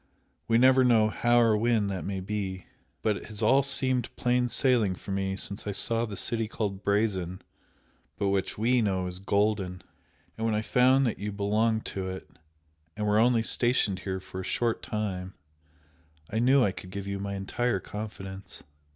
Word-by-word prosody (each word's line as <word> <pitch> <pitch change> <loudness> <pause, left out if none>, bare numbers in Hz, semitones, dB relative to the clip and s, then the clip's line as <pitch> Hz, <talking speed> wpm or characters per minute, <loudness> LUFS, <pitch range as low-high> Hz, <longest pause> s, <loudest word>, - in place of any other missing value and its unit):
We 115 - +4
never 130 +1 +6
know 115 -3 +4
how 120 +2 +2
or 115 -2 +4
when 110 -1 +2
that 95 -2 -3
may 95 -1 -3
be. 95 -1 -4 0.4
But 105 -2 +1
it - - -10
has 110 0 -5
all 130 +6 +5
seemed 130 -3 +1
plain 125 0 +1
sailing 120 -8 +2
for 100 - -9
me 95 0 -1
since 100 +1 -5
I 100 - -1
saw 115 +4 0
the 100 -2 -6
city 115 -2 -1
called 100 -3 -4
'Brazen' 100 -3 0 0.7
but 100 -1 0
which 95 -1 -1
WE 120 +3 +2
know 95 -4 0
is 90 0 -6
Golden! 100 -2 0 0.6
and 110 - -1
when 110 - +1
I 105 - -1
found 130 +4 +4
that 115 - -2
you 105 +1 -3
belonged 110 +2 0
to 95 -1 -4
it, 95 0 -7 0.7
and 105 - -2
were 105 0 +3
only 115 0 +4
stationed 120 -5 +2
here 95 -1 -4
for 95 0 -8
a - - -7
short 115 +4 -1
time, 95 -4 -4 1.0
I 110 - 0
knew 130 +3 +5
I 100 - +2
could 90 - -10
give 100 +1 -6
you 100 0 -4
my 100 0 -4
entire 110 +3 -1
confidence. 95 -2 -8
105 Hz, 185 wpm, -28 LUFS, 95-115 Hz, 1.0 s, never